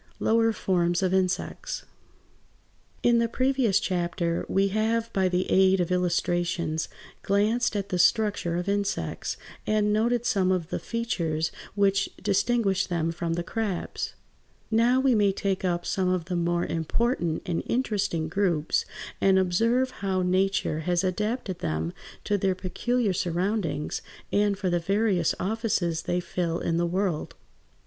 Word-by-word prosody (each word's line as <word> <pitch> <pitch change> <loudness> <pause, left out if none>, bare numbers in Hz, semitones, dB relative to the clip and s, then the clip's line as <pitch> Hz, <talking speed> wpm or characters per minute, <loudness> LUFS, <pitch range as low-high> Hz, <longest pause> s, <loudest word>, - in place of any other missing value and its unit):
LOWER 225 0 +3
FORMS 175 -3 +1
OF 185 0 +1
INSECTS 185 -1 -1 1.2
In 235 -1 +5
the 230 - +2
previous 255 -5 +2
chapter 175 -2 -1
we 195 +1 +2
have 225 +3 0
by 190 -1 +2
the 180 0 0
aid 190 0 +5
of 175 0 0
illustrations 175 -2 0 0.3
glanced 215 +4 +1
at 200 -1 -2
the 180 -2 -1
structure 200 -3 +2
of 175 +2 -2
insects, 200 0 -2 0.3
and 210 -1 +2
noted 235 +2 +1
some 190 -5 +2
of 180 -3 -1
the - - -2
features 165 -9 -2 0.2
which 200 -1 +2
distinguished 200 0 +1
them 165 -2 0
from 165 0 -2
the 170 +1 -2
crabs. 210 -1 -3 0.6
Now 235 +3 +4
we 265 -1 +3
may 205 -3 +4
take 195 0 -2
up 175 -1 0
some 190 -2 0
of 185 -2 0
the 180 0 -3
more 175 0 +1
important 170 - -1
and 170 -2 -1
interesting 205 -9 0
groups 170 -3 +1 0.4
and 195 -1 +5
observe 230 +8 +2
how 190 -2 0
Nature 185 -3 +1
has 175 +3 0
adapted 200 0 -2
them 80 - -2 0.3
to 205 -1 0
their 190 -1 +1
peculiar 210 +4 -1
surroundings, 175 -2 -1 0.3
and 205 -1 +2
for 185 -2 -1
the 175 - +2
various 195 -1 +1
offices 190 -5 0
they 175 - -1
fill 175 -1 -2
in 165 -1 -1
the 170 0 +1
world. 180 -2 -1
190 Hz, 145 wpm, -26 LUFS, 175-215 Hz, 1.2 s, In